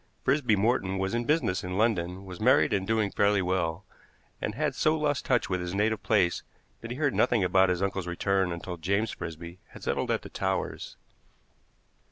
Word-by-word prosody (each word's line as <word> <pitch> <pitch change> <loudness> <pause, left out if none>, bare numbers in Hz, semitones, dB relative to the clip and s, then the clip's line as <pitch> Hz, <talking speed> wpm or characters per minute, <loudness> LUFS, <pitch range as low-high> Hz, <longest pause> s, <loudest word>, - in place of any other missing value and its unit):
Frisby 125 -5 +2
Morton 95 -2 +1
was 95 +2 -1
in 120 0 -1
business 145 - +1
in 90 +1 -4
London, 95 -4 0
was 90 -2 -9
married - - +4
and 95 -1 0
doing 110 -2 +1
fairly 100 0 +2
well, 90 0 -1 0.6
and - - -3
had - - 0
so 155 +1 +2
lost 145 -4 -1
touch 125 -3 +2
with 90 -1 -1
his 90 +1 -4
native 110 +2 +1
place 95 -6 +2 0.4
that 115 - -8
he 120 - -5
heard 145 -2 +1
nothing 120 -4 +2
about 95 +1 +4
his 90 +1 0
uncle's 95 -2 -2
return 95 +1 0
until 85 +1 -5
James 100 +6 0
Frisby 85 +2 -8
had - - -13
settled - - -1
at - - 0
the - - -9
Towers. - - -3
95 Hz, 190 wpm, -28 LUFS, 90-115 Hz, 0.6 s, married